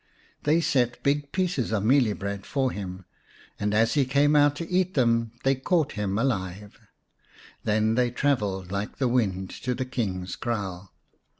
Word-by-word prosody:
They 155 +3 +4
set 125 -6 +1
big 145 0 0
pieces 180 - -1
of 105 -3 0
mealie 120 -2 +3
bread 100 0 -4
for 135 +1 0
him, 95 -2 -6 0.5
and 105 0 0
as 115 +2 +3
he 145 - +3
came 145 +3 +3
out 145 0 +5
to 165 +2 -5
eat 185 -1 0 0.5
they 135 - +4
caught 150 +4 +1
him 100 -2 -2
alive. 100 -5 -2 0.9
Then 110 +1 +2
they 125 +1 +2
travelled 105 -8 -1
like 100 +1 -3
the 130 - +1
wind 95 -7 0
to 125 0 -1
the 130 - -2
King's 95 -8 -3
kraal. 100 -5 -4
120 Hz, 160 wpm, -26 LUFS, 100-140 Hz, 0.9 s, out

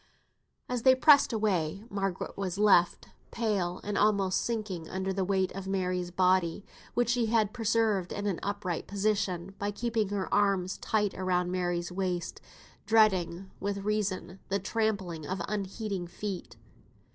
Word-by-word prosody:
As 250 -1 -2
they 260 +2 +6
pressed 285 +2 +6
away, 195 -5 0
Margaret 195 -3 -3
was 190 -2 -3
left, 195 -4 +4 0.2
pale 200 -6 -1
and 205 0 -1
almost 200 -3 +2
sinking 210 -8 -3
under 190 +1 -2
the 190 0 0
weight 190 0 +1
of 195 0 -6
Mary's 180 -2 -1
body, 185 0 +2 0.3
which 240 -1 +2
she 240 -1 +2
had 215 -2 +2
preserved 225 -5 +1
in 205 - -4
an 195 -4 -1
upright 200 -4 -3
position 200 -3 -1
by 205 - -1
keeping 225 -1 -1
her 200 -2 -2
arms 195 -2 +2
tight 210 -2 0
round 180 -1 0
Mary's 175 -1 -1
waist, 180 -2 -3 0.5
dreading, 190 -4 +3
with 200 0 -3
reason, 200 -3 -2
the 195 - +1
trampling 190 -6 -2
of 185 0 -3
unheeding 200 -2 -3
feet. 190 +1 -6
195 Hz, 145 wpm, -29 LUFS, 185-210 Hz, 0.5 s, they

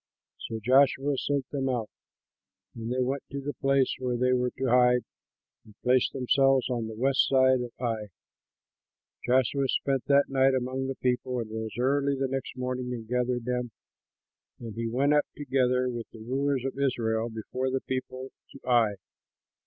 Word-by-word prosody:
So 115 - -4
Joshua 135 +4 +3
sent 140 -1 -1
them 135 -2 -1
out, 120 -4 -1 0.9
and 115 +1 -5
they 130 0 +1
went 135 +2 -2
to 140 - -5
the 145 +1 -4
place 135 -1 +1
where 125 -1 -1
they 125 +1 +2
were 125 0 +1
to 135 - -2
hide 125 0 +4 0.6
and 105 - -18
placed 125 0 +3
themselves 135 0 +2
on 115 -2 -2
the 110 - -7
west 135 +4 +2
side 130 -1 +4
of 120 -1 -5
Ai. 115 -4 -2 1.2
Joshua 130 +2 +2
spent 135 -1 0
that 140 0 +4
night 135 0 +3
among 130 +1 -2
the 135 - -3
people, 125 0 -1
and 110 -2 -5
rose 110 0 -5
early 140 +2 +1
the 135 0 0
next 130 -1 -4
morning 125 0 -3
and 115 -2 -8
gathered 125 0 -1
them, 125 -1 -2 0.9
and 115 -3 -7
he 115 +1 -3
went 135 +5 +2
up, 150 - +3
together 130 -3 +1
with 120 -2 -5
the - - -13
rulers 135 +3 -1
of 135 0 -4
Israel, 115 -4 0
before 120 +4 -3
the 130 0 -1
people 130 0 -5 0.2
to - - -11
Ai. 115 -4 +3
130 Hz, 170 wpm, -28 LUFS, 120-135 Hz, 1.2 s, hide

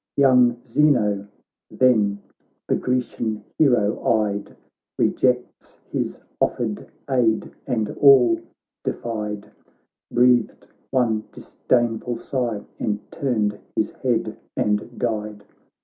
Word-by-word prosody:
Young 125 -3 +4
Zeno 110 -7 +2 0.4
then 105 -6 +2 0.4
the - - +1
Grecian 120 -3 -2 0.2
hero 120 -9 +3
eyed, 105 -2 0 0.4
Rejects 125 -1 0
his - - -2 0.2
offered - - -1 0.2
aid, 120 -5 +1 0.2
and 110 -3 -1
all 130 -5 +6 0.4
defied, 105 -3 -4 0.6
Breathed 120 -1 +3 0.2
one 115 -4 +1
disdainful 120 -1 -1
sigh, 120 -6 -2 0.2
and 105 -1 -3
turned 110 -6 -1 0.2
his - - 0
head - - -2 0.2
and 105 +3 -1
died. 105 -3 -3
115 Hz, 90 wpm, -23 LUFS, 105-125 Hz, 0.6 s, all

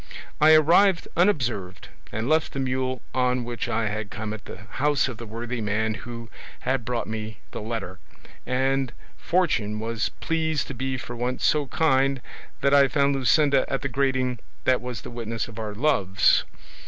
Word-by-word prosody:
I 155 +1 +7
arrived 170 +4 +5
unobserved, 125 - 0 0.2
and 110 +2 -2
left 155 +1 +2
the 135 - -3
mule 130 -1 -1
on 125 -1 +1
which 120 0 -4
I 115 -1 0
had 105 0 -4
come 110 -1 -4
at 110 -1 -9
the - - -8 0.2
house 145 -2 +3
of 125 -4 -6
the 115 0 -8
worthy 115 +2 -4
man 110 +1 0
who 115 +4 -8 0.3
had 130 -2 0
brought 120 0 -1
me 110 -1 -5
the - - -5
letter, 105 -4 -5 0.4
and 130 0 0 0.3
fortune 115 - +1
was 115 -1 -1
pleased 160 -2 0
to - - -4
be 130 +1 -2
for 120 -1 -7
once 125 +2 -2
so 150 -2 +3
kind 135 -3 +2 0.4
that 140 - +3
I 140 -1 +7
found 140 0 +2
Luscinda 135 +1 +4
at 135 -2 -2
the 135 - -1
grating 130 -2 0 0.2
that 130 -1 +3
was 125 -1 -5
the - - -9
witness 115 -1 -3
of 115 -1 -9
our 105 -2 -4
loves. 100 -8 +3
125 Hz, 175 wpm, -25 LUFS, 110-140 Hz, 0.4 s, I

